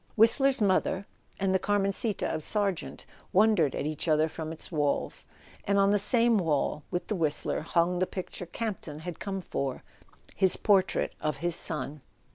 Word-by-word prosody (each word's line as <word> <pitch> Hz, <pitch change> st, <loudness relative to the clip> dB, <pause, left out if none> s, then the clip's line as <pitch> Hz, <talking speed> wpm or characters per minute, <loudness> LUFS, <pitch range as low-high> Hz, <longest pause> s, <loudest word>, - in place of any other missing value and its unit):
Whist¬ 225 Hz, +5 st, +6 dB
ler's 270 Hz, -4 st, +3 dB
Mother 190 Hz, 0 st, +1 dB, 0.3 s
and 195 Hz, -1 st, +1 dB
the 190 Hz, -, +3 dB
Carmencita 205 Hz, +2 st, +1 dB
of 155 Hz, -, -3 dB
Sargent 200 Hz, 0 st, -2 dB, 0.3 s
wondered 195 Hz, -8 st, +3 dB
at -, -, -3 dB
each 155 Hz, +2 st, -3 dB
other 155 Hz, 0 st, +3 dB
from 160 Hz, 0 st, -6 dB
its 160 Hz, -, -5 dB
walls; 145 Hz, -3 st, -1 dB, 0.4 s
and 200 Hz, 0 st, +1 dB
on 195 Hz, 0 st, +4 dB
the 205 Hz, -, +3 dB
same 230 Hz, +1 st, +4 dB
wall 150 Hz, -3 st, 0 dB
with 175 Hz, -, -3 dB
the -, -, -3 dB
Whistler 155 Hz, -5 st, 0 dB
hung 170 Hz, +3 st, +1 dB
the 185 Hz, -, +1 dB
picture 180 Hz, -1 st, -6 dB
Campton 175 Hz, -7 st, -5 dB
had 175 Hz, 0 st, -7 dB
come 195 Hz, -1 st, -4 dB
for: 135 Hz, -5 st, -4 dB, 0.5 s
his 190 Hz, -2 st, +4 dB
portrait 195 Hz, -3 st, +2 dB
of 150 Hz, -2 st, -2 dB
his 170 Hz, +2 st, 0 dB
son. 150 Hz, -3 st, -4 dB
185 Hz, 170 wpm, -28 LUFS, 155-200 Hz, 0.5 s, Whist¬